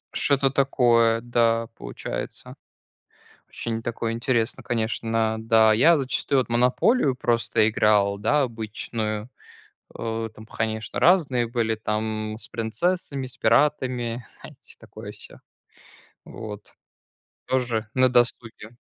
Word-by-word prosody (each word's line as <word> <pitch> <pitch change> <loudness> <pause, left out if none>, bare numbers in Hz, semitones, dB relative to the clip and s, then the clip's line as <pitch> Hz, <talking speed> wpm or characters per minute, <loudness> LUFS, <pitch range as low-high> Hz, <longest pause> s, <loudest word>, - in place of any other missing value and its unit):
Что-то 140 -1 +3
такое, 120 -4 +3
да, 115 -1 +1
получается. - - -6 0.9
Очень 115 -1 -4
такое 115 0 -3
интересное, 115 -1 -1
конечно. 115 -1 -1
Да, 110 -1 +5
я 160 +10 +5
зачастую 135 0 +1
вот 125 - -2
в - - -18
"Монополию" 125 - +3
просто 115 -3 +2
играл, 105 -2 +2
да, 145 +8 +2
обычную. 110 -1 -4 0.6
О, 115 0 -4
там, 110 0 -14
конечно, 110 0 -3
разные 145 -9 +3
были, 115 -1 -1
там, 110 0 -3
с - - -8
принцессами, 140 +4 -2
с 125 - -6
пиратами, 120 -2 +1 0.2
знаете, - - -9
такое - - -10
всё. - - -11 0.9
Вот. 105 -2 -9 0.8
Тоже 120 -4 -1
на 130 0 +4
досуге. 120 -3 0
115 Hz, 110 wpm, -24 LUFS, 110-125 Hz, 0.9 s, Да